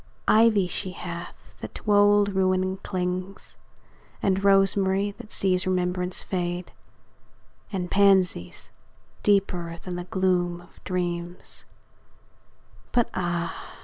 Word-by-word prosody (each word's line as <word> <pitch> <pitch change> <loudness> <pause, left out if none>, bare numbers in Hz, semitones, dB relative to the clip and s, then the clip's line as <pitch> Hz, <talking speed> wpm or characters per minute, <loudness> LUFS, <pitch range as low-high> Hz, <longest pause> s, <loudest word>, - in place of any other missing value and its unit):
Ivy 215 -3 +5
she 185 +1 -4
hath, 170 -1 -8
that - - -8
to 210 - -1
old 205 0 +5
ruin 185 -1 +1
clings; 185 0 -4 0.6
And 195 0 0
rosemary, 195 0 +3
that 215 - -11
sees 185 -1 +1
remembrance 180 0 -1
fade; 175 -1 -3 1.0
And 180 -3 -3
pansies, 190 - +2 0.5
deeper 185 -4 +1
than 180 0 -6
the 175 - -5
gloom 180 -2 0
of 175 - -19
dreams; 175 -1 -4 1.3
But 240 -2 +1
ah! 175 -2 -3
185 Hz, 105 wpm, -25 LUFS, 180-195 Hz, 1.3 s, Ivy